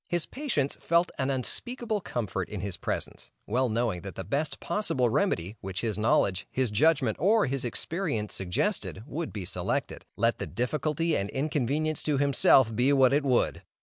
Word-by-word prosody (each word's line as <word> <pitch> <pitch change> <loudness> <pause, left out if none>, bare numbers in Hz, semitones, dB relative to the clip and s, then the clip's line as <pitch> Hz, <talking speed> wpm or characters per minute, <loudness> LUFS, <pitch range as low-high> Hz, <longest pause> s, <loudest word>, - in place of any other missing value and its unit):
His 175 -2 -1
patients 240 - -2
felt 170 +2 +2
an 135 0 0
unspeakable 220 - -2
comfort 100 - -3
in 105 -3 -5
his 100 -2 -3
presence, - - -4 0.2
well 125 +4 +1
knowing 110 -5 0
that 95 +2 -8
the 95 - -5
best 140 - -2
possible 130 - 0
remedy 105 - 0
which 95 0 -4
his 110 -3 -1
knowledge, 100 -4 +2
his 130 -4 0
judgment 135 0 +3
or 210 +7 +4
his 135 -1 -2
experience 125 - -2
suggested, 95 +2 -1
would 160 +2 -4
be 100 -4 -5
selected, - - -2
let 115 +2 +1
the - - -3
difficulty 150 +6 -1
and 100 +1 -1
inconvenience 150 +2 0
to 150 -2 +1
himself 135 -4 +5
be 125 +5 +3
what 135 -2 +5
it 145 +1 +3
would. 130 -3 +1
130 Hz, 170 wpm, -28 LUFS, 110-155 Hz, 0.2 s, himself